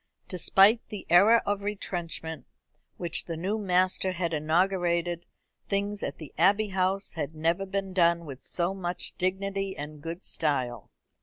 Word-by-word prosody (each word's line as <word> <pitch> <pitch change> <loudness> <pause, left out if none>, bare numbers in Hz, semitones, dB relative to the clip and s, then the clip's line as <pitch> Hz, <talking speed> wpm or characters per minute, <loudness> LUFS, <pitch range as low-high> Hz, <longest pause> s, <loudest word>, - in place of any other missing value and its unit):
Despite 195 +5 +4
the 210 - -7
era 210 +7 +6
of 205 0 -1
retrenchment 170 -7 -4 0.5
which 170 -2 +1
the 165 -2 -5
new 195 +6 -1
master 185 -1 +2
had 170 -2 -2
inaugurated, 170 +2 +1 0.4
things 200 +1 -1
at 140 - -4
the 155 -4 -10
Abbey 200 +4 +4
House 190 +1 0
had 155 -1 -4
never 165 +5 0
been 195 0 -3
done 170 -2 +3
with 135 -3 -9
so 175 +2 -1
much 180 -2 -4
dignity 195 +1 -1
and 150 +1 -7
good 165 +4 -6
style. 125 - -1
180 Hz, 145 wpm, -28 LUFS, 165-195 Hz, 0.5 s, era